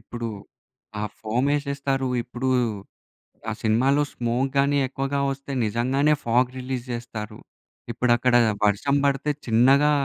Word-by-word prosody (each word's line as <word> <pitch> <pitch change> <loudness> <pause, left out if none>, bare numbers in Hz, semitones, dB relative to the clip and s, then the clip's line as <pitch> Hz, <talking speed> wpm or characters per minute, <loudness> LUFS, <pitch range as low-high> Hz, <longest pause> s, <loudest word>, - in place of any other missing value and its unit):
ఇప్పుడు 115 +1 -6 0.7
ఆ - - -2 0.2
ఫోమేషేస్తారు. 140 +3 -1
ఇప్పుడూ 125 +2 -4 1.0
ఆ - - -1
సినిమాలో 130 +6 +3
స్మోక్ 120 +3 -1
గానీ 140 +1 +3
ఎక్కువగా 135 +1 -2
వస్తే, 135 +1 -7
నిజంగానే 130 +7 +1
ఫాగ్ 120 +2 +2
రిలీజ్ 125 -1 -4
జెస్తారు. 110 -3 -6 0.5
ఇపుడక్కడా 120 +1 +3 0.3
వర్షం 120 +8 +1
బడతే 140 +1 +1 0.2
చిన్నగా 135 +6 +4
130 Hz, 110 wpm, -24 LUFS, 120-140 Hz, 1.0 s, చిన్నగా